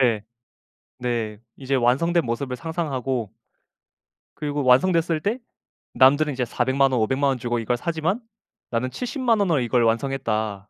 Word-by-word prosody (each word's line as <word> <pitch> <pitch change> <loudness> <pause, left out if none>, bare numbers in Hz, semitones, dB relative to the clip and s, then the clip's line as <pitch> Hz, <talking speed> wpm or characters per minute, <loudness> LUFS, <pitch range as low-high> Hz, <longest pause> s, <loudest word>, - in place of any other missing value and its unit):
네. 115 -5 +2 0.8
네. 115 -4 -2 0.2
이제 135 0 -3
완성된 140 +7 +2
모습을 125 +2 -3
상상하고 135 - -3 1.0
그리고 145 -1 -3
완성됐을 165 +5 +3
때 210 +9 -1 0.6
남들은 145 +3 +5
이제 125 -1 -1
4,000,000 130 +3 +1
원, 125 -3 +1
5,000,000 130 +6 +1
원 135 -2 +1
주고 120 0 -2
이걸 120 +2 -1
사지만 170 - -1 0.5
나는 125 +2 -1
700,000 250 - 0
원으로 175 -8 +2
이걸 120 0 +1
완성했다. 115 -4 -1
130 Hz, 265 characters per minute, -23 LUFS, 120-160 Hz, 1.0 s, 남들은